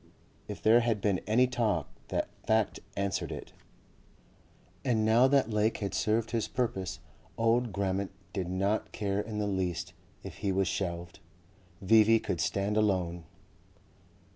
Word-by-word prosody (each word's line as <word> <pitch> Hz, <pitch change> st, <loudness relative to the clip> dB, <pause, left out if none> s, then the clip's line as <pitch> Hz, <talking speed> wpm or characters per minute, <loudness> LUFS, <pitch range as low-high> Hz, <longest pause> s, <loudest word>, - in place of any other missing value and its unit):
If -, -, -7 dB
there 115 Hz, +2 st, +6 dB
had 115 Hz, -3 st, +1 dB
been 100 Hz, -2 st, 0 dB
any 120 Hz, +4 st, +4 dB
talk 115 Hz, -, 0 dB, 0.2 s
that -, -, -1 dB, 0.2 s
fact 110 Hz, -1 st, +2 dB, 0.2 s
answered 100 Hz, 0 st, -1 dB
it. -, -, -8 dB, 1.3 s
And 115 Hz, -5 st, +1 dB
now 115 Hz, +4 st, +5 dB
that 135 Hz, -3 st, +2 dB
Lake 105 Hz, +1 st, +1 dB
had 100 Hz, -2 st, -3 dB
served 110 Hz, +1 st, 0 dB
his 115 Hz, -3 st, 0 dB
purpose 95 Hz, -7 st, -2 dB, 0.4 s
old 115 Hz, +1 st, +2 dB
Grammont 100 Hz, 0 st, -1 dB, 0.2 s
did 95 Hz, -4 st, -2 dB
not 100 Hz, +4 st, -1 dB
care 100 Hz, -1 st, -1 dB
in 105 Hz, 0 st, -4 dB
the 105 Hz, -, 0 dB
least 90 Hz, -3 st, -2 dB, 0.3 s
if -, -, -8 dB
he 100 Hz, -, -1 dB
was 95 Hz, 0 st, +1 dB
shelved. 85 Hz, -1 st, -3 dB, 0.6 s
V.V. 110 Hz, +3 st, +6 dB
could -, -, -2 dB
stand 100 Hz, +2 st, 0 dB
alone. 90 Hz, -5 st, 0 dB
105 Hz, 140 wpm, -30 LUFS, 95-115 Hz, 1.3 s, there